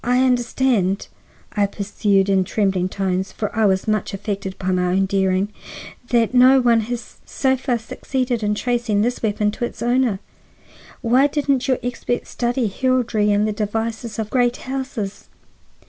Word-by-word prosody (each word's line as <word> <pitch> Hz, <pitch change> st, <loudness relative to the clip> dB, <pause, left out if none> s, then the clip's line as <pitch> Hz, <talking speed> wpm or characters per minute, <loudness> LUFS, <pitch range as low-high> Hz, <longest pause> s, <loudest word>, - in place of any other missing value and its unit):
"I 250 Hz, +2 st, +3 dB
understand," 245 Hz, -5 st, +1 dB, 0.4 s
I 205 Hz, -1 st, +2 dB
pursued 200 Hz, -1 st, 0 dB
in 195 Hz, -1 st, +3 dB
trembling 190 Hz, -2 st, 0 dB
tones, 190 Hz, -1 st, -2 dB
for 210 Hz, +1 st, -4 dB
I 220 Hz, -1 st, +3 dB
was 190 Hz, +1 st, +1 dB
much 215 Hz, -1 st, 0 dB
affected 195 Hz, -1 st, -4 dB
by 185 Hz, 0 st, -2 dB
my 180 Hz, -1 st, +1 dB
own 190 Hz, +2 st, +2 dB
daring, 190 Hz, 0 st, +1 dB, 0.6 s
"that 235 Hz, -1 st, +2 dB
no 255 Hz, +2 st, +7 dB
one 240 Hz, -2 st, +4 dB
has 240 Hz, -2 st, -6 dB
so 265 Hz, -1 st, 0 dB
far 255 Hz, -1 st, -1 dB
succeeded 245 Hz, +1 st, -3 dB
in 210 Hz, 0 st, 0 dB
tracing 235 Hz, -3 st, 0 dB
this 245 Hz, +2 st, -1 dB
weapon 210 Hz, -1 st, 0 dB
to 240 Hz, -, -3 dB
its -, -, -7 dB
owner. 240 Hz, -4 st, +2 dB, 0.8 s
Why 255 Hz, +4 st, +4 dB
didn't 280 Hz, -3 st, 0 dB
your 260 Hz, -2 st, +2 dB
experts 245 Hz, 0 st, -3 dB
study 240 Hz, 0 st, 0 dB
heraldry 230 Hz, -2 st, +1 dB
and 205 Hz, +1 st, +2 dB
the -, -, 0 dB
devices 225 Hz, +2 st, -3 dB
of 220 Hz, -1 st, -4 dB
great 245 Hz, -1 st, +2 dB
houses? 260 Hz, -6 st, -5 dB
225 Hz, 160 wpm, -21 LUFS, 200-245 Hz, 0.8 s, no